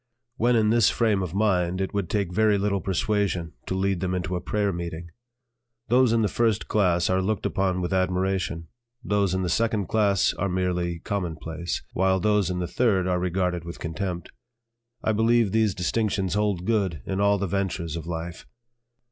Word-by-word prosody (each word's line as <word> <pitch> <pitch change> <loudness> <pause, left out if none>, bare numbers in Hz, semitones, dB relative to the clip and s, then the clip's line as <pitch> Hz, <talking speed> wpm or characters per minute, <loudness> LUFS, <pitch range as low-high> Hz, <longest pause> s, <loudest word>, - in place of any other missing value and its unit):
When 120 +1 +3
in 110 -1 +3
this 115 -2 +5
frame 110 -4 +1
of 90 -1 -4
mind 95 -4 +1
it 95 +1 -2
would 100 -4 -2
take 100 -4 -1
very 105 +1 +3
little 100 -1 0
persuasion 95 -2 -1
to 95 - -2
lead 95 -1 0
them 90 +1 -1
into 90 0 -2
a 90 - -2
prayer 105 -2 0
meeting. 85 -1 -6 0.8
Those 125 0 +4
in 115 -1 +2
the - - +3
first 110 -1 0
class 90 -4 +2
are 95 0 +2
looked 105 +1 -1
upon 95 -1 0
with 90 +1 -2
admiration; 95 -2 0 0.4
those 100 -3 +1
in 95 - 0
the - - -1
second 110 +3 +1
class 100 -4 +2
are 100 - -2
merely 90 -2 -1
commonplace; 85 -2 -4
while 95 0 +2
those 105 -1 +2
in 90 - -2
the 90 -1 -2
third 100 -3 +1
are 90 -1 +1
regarded 90 -1 -1
with 85 0 -7
contempt. 85 +2 -4 0.7
I 110 - +2
believe 115 0 +3
these 110 -2 +2
distinctions 95 0 0
hold 105 -4 0
good 95 - 0
in 95 +1 -2
all 100 0 +4
the 100 - -1
ventures 90 -4 -2
of 85 -1 -6
life. 85 0 -6
95 Hz, 180 wpm, -25 LUFS, 90-105 Hz, 0.8 s, this